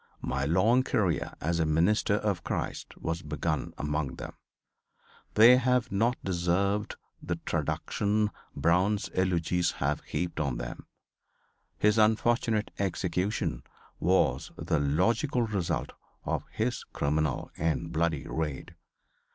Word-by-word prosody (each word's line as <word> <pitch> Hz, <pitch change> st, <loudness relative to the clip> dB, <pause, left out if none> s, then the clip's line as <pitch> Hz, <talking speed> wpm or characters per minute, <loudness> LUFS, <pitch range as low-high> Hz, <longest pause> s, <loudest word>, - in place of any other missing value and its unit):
My 70 Hz, +2 st, -1 dB
long 105 Hz, -, +4 dB
career, 110 Hz, -10 st, 0 dB
as 85 Hz, +2 st, 0 dB
a 80 Hz, -, +2 dB
minister 90 Hz, +7 st, +3 dB
of 100 Hz, -5 st, -1 dB
Christ, -, -, -4 dB
was 80 Hz, +1 st, -3 dB
begun 75 Hz, 0 st, -2 dB
among 75 Hz, -1 st, -2 dB
them. -, -, -7 dB, 1.0 s
They 115 Hz, +4 st, +8 dB
have 125 Hz, -2 st, +1 dB
not 115 Hz, +5 st, +2 dB
deserved 95 Hz, +3 st, 0 dB, 0.3 s
the -, -, -2 dB
traduction 105 Hz, +1 st, 0 dB, 0.2 s
Brown's 90 Hz, +7 st, +2 dB
eulogists 90 Hz, -1 st, +1 dB
have 70 Hz, +2 st, -1 dB
heaped 85 Hz, -2 st, -3 dB
on 70 Hz, -5 st, -1 dB
them. -, -, -7 dB, 0.9 s
His 105 Hz, +1 st, +3 dB
unfortunate 110 Hz, 0 st, +2 dB
execution 90 Hz, -, -1 dB, 0.4 s
was -, -, +2 dB
the 80 Hz, -, 0 dB
logical 115 Hz, -, +1 dB
result 95 Hz, -7 st, -1 dB, 0.3 s
of -, -, -2 dB
his -, -, -2 dB
criminal 75 Hz, -1 st, 0 dB
and 80 Hz, +1 st, -1 dB
bloody 80 Hz, -4 st, 0 dB
raid. 75 Hz, -4 st, -3 dB
90 Hz, 115 wpm, -29 LUFS, 80-105 Hz, 1.0 s, They